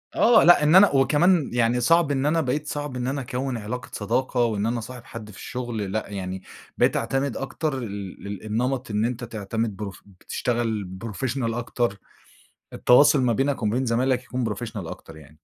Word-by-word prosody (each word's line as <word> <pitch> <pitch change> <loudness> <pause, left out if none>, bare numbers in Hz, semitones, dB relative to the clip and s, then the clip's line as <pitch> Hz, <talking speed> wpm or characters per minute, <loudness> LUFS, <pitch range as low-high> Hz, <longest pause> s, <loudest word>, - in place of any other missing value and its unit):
آه 230 -2 +6
لأ، 175 -3 +7
إن 150 +3 +5
أنا 195 +2 +8
وكمان 145 +4 +3
يعني 120 0 +2
صعب 165 +3 +4
إن 135 -1 0
أنا 165 +2 +2
بقيت 150 +2 -2
صعب 145 -3 -4
إن 125 0 -2
أنا 140 +1 -2
أكوِّن 130 0 -3
علاقة 115 +3 -6
صداقة، 120 +4 0
وإن 105 -2 -1
أنا 120 +1 0
أصاحب 120 +2 -9
حد 110 -2 -9
في - - -14
الشغل 115 -6 -4
لأ، 110 0 -3
يعني 95 -2 -5 0.3
بقيت - - +3
أعتمد 135 -2 -1
أكتر 135 +2 -3
ال 100 -6 -6
لل 100 -1 -6
النمط 120 +3 -2
إن 105 +1 +1
أنتَ 125 0 -3
تعتمد 110 -1 -3
بروف 100 -3 -7
بتشتغل 105 0 -3
professional 115 +1 -2
أكتر. 120 -3 -2 0.7
التواصل 140 +3 +5
ما 125 -2 +2
بينك 135 +4 0
وما 105 +1 +1
بين 130 +1 0
زمايلك 125 +2 +1
يكون 125 -1 -3
professional 105 -5 -6
أكتر 80 -1 -10
يعني. 75 -2 -14
120 Hz, 185 wpm, -24 LUFS, 105-135 Hz, 0.7 s, أنا